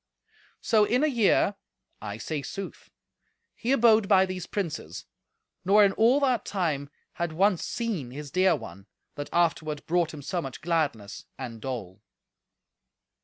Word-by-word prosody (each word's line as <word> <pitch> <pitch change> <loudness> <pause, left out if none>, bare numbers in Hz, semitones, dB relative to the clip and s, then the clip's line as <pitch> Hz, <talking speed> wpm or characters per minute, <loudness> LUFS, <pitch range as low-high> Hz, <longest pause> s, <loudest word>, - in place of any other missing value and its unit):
So 220 -3 +3
in 250 +6 +2
a - - +4
year 230 -6 +3 0.5
(I 105 -1 -5
say 145 +6 -4
sooth) 195 +8 -7 0.6
he 240 - -3
abode 225 -5 +5
by 190 -2 +5
these 185 -2 -6
princes, 155 - -4 0.6
nor 205 +2 +6
in 195 - +3
all 235 +7 +4
that 255 -6 +2
time 155 -8 -2 0.2
had 170 -2 -3
once 190 +1 +2
seen 215 - -3
his 140 +2 -8
dear 185 0 +4
one, 95 +4 -10 0.3
that 145 - -6
afterward 160 -3 0
brought 170 -1 +1
him 150 -2 -9
so 175 +4 -2
much 135 -4 -7
gladness 150 -11 -2
and 115 -4 -7
dole. 110 -9 -6
170 Hz, 145 wpm, -27 LUFS, 140-205 Hz, 0.6 s, nor